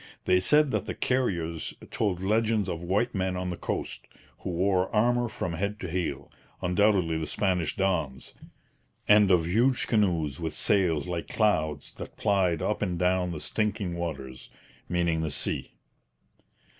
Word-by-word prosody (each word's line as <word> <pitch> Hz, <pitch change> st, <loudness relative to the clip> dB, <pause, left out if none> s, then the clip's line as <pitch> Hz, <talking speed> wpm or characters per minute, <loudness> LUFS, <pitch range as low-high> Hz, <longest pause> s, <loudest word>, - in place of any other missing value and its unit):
They 90 Hz, 0 st, +4 dB
said 150 Hz, +8 st, +4 dB
that -, -, -1 dB
the -, -, -3 dB
Carriers 85 Hz, -11 st, -1 dB, 0.2 s
told 95 Hz, -4 st, -1 dB
legends 110 Hz, 0 st, +1 dB
of 85 Hz, -2 st, -3 dB
'white 100 Hz, +8 st, 0 dB
men 95 Hz, -2 st, -1 dB
on 90 Hz, 0 st, -3 dB
the -, -, -3 dB
coast, -, -, -4 dB, 0.3 s
who -, -, -5 dB
wore 90 Hz, +1 st, +1 dB
armour 120 Hz, +3 st, +2 dB
from 90 Hz, -6 st, -4 dB
head 100 Hz, +5 st, -3 dB
to 90 Hz, -, -4 dB
heel' 80 Hz, -5 st, -3 dB, 0.3 s
undoubtedly 90 Hz, -3 st, +2 dB
the 80 Hz, -, -3 dB
Spanish 90 Hz, -6 st, 0 dB
dons 85 Hz, -9 st, -1 dB, 0.7 s
and 105 Hz, -2 st, +6 dB
of 90 Hz, -3 st, +4 dB
'huge 120 Hz, +9 st, +2 dB
canoes 85 Hz, -, +1 dB
with 80 Hz, -2 st, -3 dB
sails 90 Hz, -9 st, +2 dB
like 85 Hz, -2 st, -3 dB
clouds' 80 Hz, -10 st, 0 dB
that -, -, -9 dB
plied 95 Hz, -5 st, +1 dB
up 105 Hz, -, -1 dB
and 90 Hz, -4 st, -1 dB
down 90 Hz, 0 st, +1 dB
'the 80 Hz, -3 st, -5 dB
stinking 105 Hz, -4 st, -1 dB
waters' 70 Hz, -7 st, -6 dB, 0.4 s
meaning 85 Hz, -2 st, +1 dB
the 80 Hz, -, -1 dB
sea. -, -, -1 dB
90 Hz, 155 wpm, -27 LUFS, 85-105 Hz, 0.7 s, and